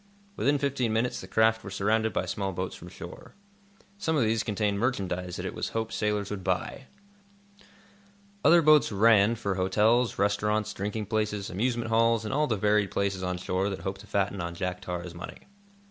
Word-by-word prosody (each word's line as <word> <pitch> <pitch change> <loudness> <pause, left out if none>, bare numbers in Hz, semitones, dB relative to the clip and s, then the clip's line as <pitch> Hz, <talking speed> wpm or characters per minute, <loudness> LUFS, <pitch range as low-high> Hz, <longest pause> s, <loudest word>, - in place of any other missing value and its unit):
Within 145 +2 +2
fifteen 135 -4 0
minutes 115 +3 0
the - - -9
craft 110 0 +2
were 100 - -7
surrounded 110 +3 +1
by 90 - -1
small 95 +1 -3
boats 90 +1 -4
from 85 - -11
shore. 90 - -11 0.6
Some 160 -5 0
of 140 - +3
these 110 0 +1
contained 105 -2 -1
merchandise 90 -7 -2
that - - -5
it - - -4
was - - -3
hoped 110 0 -3
sailors 105 -2 -1
would 100 -2 -5
buy. 95 +8 -2 1.6
Other 170 0 +6
boats 155 -3 +5
"ran" 105 +1 +5
for 100 -3 -2
hotels, 110 +6 +2
restaurants, 105 +1 0
drinking 105 +2 -3
places, 105 0 -2
amusement 115 +3 -1
halls, 115 0 +3
and 110 - -3
all 150 +2 +2
the 110 - 0
varied 105 0 +2
places 100 -1 -1
on 90 -1 -2
shore 95 +2 -1
that 95 - -5
hope 95 0 -4
to 105 - -13
fatten 100 -1 -1
on 85 0 -4
Jack 90 0 -3
Tar's 90 -1 -5
money. 85 0 -9
105 Hz, 185 wpm, -28 LUFS, 95-115 Hz, 1.6 s, Other